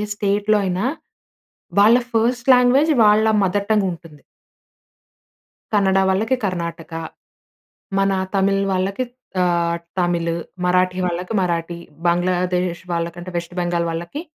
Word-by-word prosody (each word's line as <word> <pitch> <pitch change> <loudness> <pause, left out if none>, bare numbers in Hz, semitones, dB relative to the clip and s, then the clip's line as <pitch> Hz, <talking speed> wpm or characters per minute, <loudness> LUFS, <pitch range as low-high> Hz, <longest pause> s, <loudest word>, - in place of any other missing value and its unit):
స్టేట్‌‌లో 205 +1 +1
అయినా 185 +4 -1 0.9
వాళ్ళ 220 +4 +7 0.2
ఫస్ట్ 240 +3 +1
లాంగ్వేజ్ 255 +5 +4
వాళ్ళ 210 +1 +5 0.2
మదర్ 200 +2 0
టంగ్ 210 -2 +3
ఉంటుంది. 165 -4 -12 1.5
కన్నడ 195 -2 +3
వాళ్ళకి 220 +7 +1
కర్ణాటక, 170 -3 -4 1.1
మన 195 0 +2 0.2
తమిళ్ 195 0 +2
వాళ్ళకి 195 +6 -1 0.4
ఆహ్, 170 -1 +1 0.2
తమిళ్, 170 -1 0 0.3
మరాఠీ 180 0 +2
వాళ్ళకి 180 +3 -4
మరాఠీ, 170 -1 -2 0.3
బంగ్లాదేశ్ 180 0 0
వాళ్ళకంటే 170 +2 -4
వెస్ట్ 170 +1 -6
బెంగాల్ 175 -1 -1
వాళ్ళకి 170 - -5
185 Hz, 105 wpm, -20 LUFS, 170-205 Hz, 1.5 s, వాళ్ళ